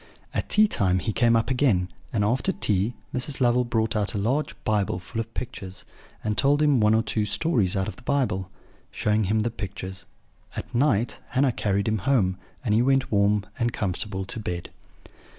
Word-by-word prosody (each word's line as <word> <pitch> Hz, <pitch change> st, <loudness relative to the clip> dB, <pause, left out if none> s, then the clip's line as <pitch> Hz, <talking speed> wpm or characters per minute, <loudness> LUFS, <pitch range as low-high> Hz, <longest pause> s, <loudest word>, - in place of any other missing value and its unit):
At -, -, -2 dB
tea 215 Hz, +1 st, +5 dB
time 95 Hz, -, +2 dB
he 110 Hz, +4 st, -2 dB
came 115 Hz, +1 st, +4 dB
up 115 Hz, +3 st, +1 dB
again; 125 Hz, -9 st, +2 dB, 0.2 s
and 105 Hz, -3 st, +1 dB
after 125 Hz, -, +1 dB
tea 105 Hz, -, 0 dB, 0.2 s
Mrs. 130 Hz, +2 st, -2 dB
Lovel 125 Hz, -1 st, +3 dB
brought 115 Hz, -2 st, 0 dB
out 105 Hz, -1 st, 0 dB
a -, -, 0 dB
large 130 Hz, +9 st, 0 dB
Bible 105 Hz, -4 st, +1 dB
full 95 Hz, +6 st, -6 dB
of 115 Hz, 0 st, -9 dB
pictures, 95 Hz, -6 st, -6 dB, 0.4 s
and 105 Hz, 0 st, 0 dB
told 145 Hz, +4 st, +3 dB
him 145 Hz, -4 st, +4 dB
one 105 Hz, 0 st, +4 dB
or 110 Hz, -, +2 dB
two 110 Hz, -, -1 dB
stories 105 Hz, -, +1 dB
out 95 Hz, -1 st, 0 dB
of -, -, -6 dB
the -, -, -14 dB
Bible, 120 Hz, -9 st, 0 dB, 0.4 s
showing 105 Hz, 0 st, +1 dB
him 110 Hz, +3 st, +1 dB
the 115 Hz, +2 st, -1 dB
pictures. 95 Hz, -3 st, -6 dB, 0.5 s
At -, -, -6 dB
night 120 Hz, -3 st, +1 dB
Hannah 135 Hz, 0 st, +2 dB
carried 100 Hz, -3 st, 0 dB
him 110 Hz, -1 st, +1 dB
home, 95 Hz, -5 st, +2 dB, 0.3 s
and 105 Hz, -, +2 dB
he 110 Hz, -, +4 dB
went 135 Hz, +1 st, +2 dB
warm 100 Hz, 0 st, +3 dB
and 120 Hz, 0 st, +1 dB
comfortable 95 Hz, -2 st, -2 dB
to 105 Hz, -, -4 dB
bed. 90 Hz, -5 st, -5 dB
110 Hz, 190 wpm, -25 LUFS, 100-125 Hz, 0.5 s, tea